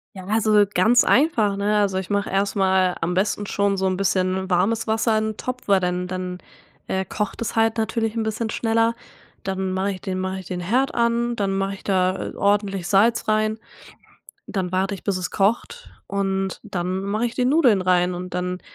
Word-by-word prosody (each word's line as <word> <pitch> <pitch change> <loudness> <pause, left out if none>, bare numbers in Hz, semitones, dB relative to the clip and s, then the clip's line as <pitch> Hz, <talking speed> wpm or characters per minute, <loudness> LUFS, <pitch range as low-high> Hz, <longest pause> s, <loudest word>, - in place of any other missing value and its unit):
Ja, 190 -1 -9
also, 215 0 +3
ganz 225 +7 +5
einfach, 235 -8 +3
ne? 205 +1 +1
Also, 195 -2 +1
ich 190 - -7
mache 200 -1 -1
erst 195 +1 0
mal 190 -2 +2
am 170 +2 0
besten 205 +2 0
schon 200 0 0
so 190 - 0
'n 185 - +1
bisschen 190 0 0
warmes 210 +6 +1
Wasser 220 +1 +1
in 215 - -1
'n - - -27
Topf 255 0 -5
weil 200 -2 +4
dann 180 0 -1
dann, 180 0 -5 0.5
äh, 190 0 -1
kocht 210 +2 -4
es 225 - -4
halt 225 0 +2
natürlich 225 0 -1
'n 225 - 0
bisschen 220 +1 -2
schneller. 230 0 +1 0.5
Dann 190 -1 -2
mache 190 +2 -1
ich 185 - -7
den 190 -2 -3
mache 190 0 -3
ich 185 - -11
den 180 -1 -4
Herd 250 +9 0
an, 235 0 +1
dann 195 -2 -1
mache 195 0 -1
ich - - -15
da, 185 -1 0
äh, - - -13
ordentlich 200 -3 0
Salz 225 +4 +3
rein. 215 0 +1 0.9
Dann 185 -3 -3
warte 190 +2 0
ich - - -13
bis 200 -2 0
es 180 -1 -3
kocht 235 - -1 0.2
und 195 -1 -2
dann 185 +1 -3
mache 210 +4 -1
ich 235 - -4
die 250 - +1
Nudeln 255 - +4
rein 180 -1 +2
und 180 0 -6
dann 180 0 -2
195 Hz, 205 wpm, -22 LUFS, 185-220 Hz, 0.9 s, ganz